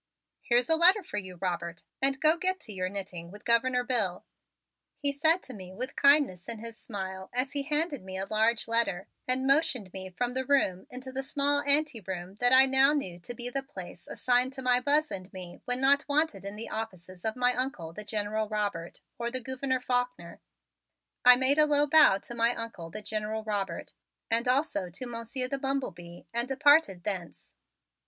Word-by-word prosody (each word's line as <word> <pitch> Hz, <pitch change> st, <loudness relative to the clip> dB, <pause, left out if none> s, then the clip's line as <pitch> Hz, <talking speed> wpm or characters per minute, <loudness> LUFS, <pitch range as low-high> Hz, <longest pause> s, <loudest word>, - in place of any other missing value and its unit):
"Here's 240 Hz, +1 st, +2 dB
a 325 Hz, -, +4 dB
letter 370 Hz, +5 st, +6 dB
for 210 Hz, -, -7 dB
you, 185 Hz, -2 st, -9 dB
Robert, 170 Hz, -1 st, -4 dB, 0.2 s
and 270 Hz, 0 st, +4 dB
go 310 Hz, +1 st, +5 dB
get 370 Hz, +2 st, -1 dB
to 215 Hz, -, -7 dB
your 185 Hz, -1 st, -3 dB
knitting 185 Hz, -4 st, -6 dB
with 205 Hz, +3 st, -14 dB
Governor 250 Hz, +2 st, +2 dB
Bill," 220 Hz, -8 st, -1 dB, 0.7 s
he 285 Hz, -, 0 dB
said 315 Hz, +5 st, +2 dB
to 260 Hz, -, -9 dB
me 185 Hz, -3 st, -10 dB
with 255 Hz, +6 st, -5 dB
kindness 280 Hz, -, +3 dB
in 230 Hz, -, -2 dB
his 230 Hz, +1 st, -8 dB
smile 190 Hz, -4 st, -7 dB
as 255 Hz, +2 st, 0 dB
he 285 Hz, -, -1 dB
handed 295 Hz, +1 st, +1 dB
me 190 Hz, 0 st, -7 dB
a 190 Hz, -, -3 dB
large 220 Hz, +2 st, +1 dB
letter 225 Hz, -5 st, 0 dB, 0.2 s
and 255 Hz, +1 st, +3 dB
motioned 270 Hz, -, +2 dB
me 190 Hz, -1 st, -6 dB
from 245 Hz, +7 st, -3 dB
the 260 Hz, +1 st, -2 dB
room 250 Hz, -9 st, +1 dB
into 260 Hz, +1 st, -8 dB
the 265 Hz, +1 st, -3 dB
small 285 Hz, +1 st, +1 dB
anteroom 220 Hz, -, 0 dB
that 245 Hz, 0 st, +3 dB
I 260 Hz, +1 st, +8 dB
now 270 Hz, +2 st, +4 dB
knew 185 Hz, -13 st, -3 dB
to 240 Hz, +7 st, -8 dB
be 240 Hz, 0 st, -2 dB
the 275 Hz, -, -2 dB
place 270 Hz, +2 st, -10 dB
assigned 250 Hz, +1 st, +1 dB
to 265 Hz, -1 st, -7 dB
my 250 Hz, -1 st, +4 dB
Buzz 295 Hz, +4 st, +1 dB
and 185 Hz, 0 st, -7 dB
me 180 Hz, -2 st, -9 dB
when 245 Hz, 0 st, 0 dB
not 280 Hz, +1 st, +3 dB
wanted 285 Hz, -10 st, 0 dB
in 200 Hz, +1 st, -6 dB
the 220 Hz, +2 st, -6 dB
offices 185 Hz, -5 st, -7 dB
of 220 Hz, 0 st, -2 dB
my 250 Hz, 0 st, +2 dB
Uncle, 245 Hz, -11 st, -3 dB
the 210 Hz, -, -7 dB
General 210 Hz, 0 st, -2 dB
Robert, 205 Hz, -6 st, -4 dB, 0.2 s
or 235 Hz, 0 st, -1 dB
the 255 Hz, +2 st, -2 dB
Gouverneur 260 Hz, +1 st, -2 dB
Faulkner. 245 Hz, -8 st, -3 dB, 0.8 s
I 250 Hz, 0 st, +9 dB
made 265 Hz, +4 st, +4 dB
a 305 Hz, -, +5 dB
low 290 Hz, 0 st, +3 dB
bow 295 Hz, -9 st, +6 dB
to 240 Hz, -, -9 dB
my 235 Hz, +1 st, +1 dB
Uncle, 230 Hz, -8 st, -6 dB
the 210 Hz, +5 st, -7 dB
General 215 Hz, +1 st, -3 dB
Robert, 200 Hz, -5 st, -4 dB, 0.4 s
and 230 Hz, +2 st, +1 dB
also 250 Hz, -, 0 dB
to 200 Hz, +9 st, -5 dB
Monsieur 240 Hz, +2 st, -3 dB
the 275 Hz, +1 st, -3 dB
Bumble 270 Hz, -3 st, -2 dB
Bee 175 Hz, 0 st, -13 dB
and 235 Hz, +1 st, 0 dB
departed 275 Hz, -, +3 dB
thence. 185 Hz, -4 st, -5 dB
240 Hz, 195 wpm, -28 LUFS, 195-270 Hz, 0.8 s, I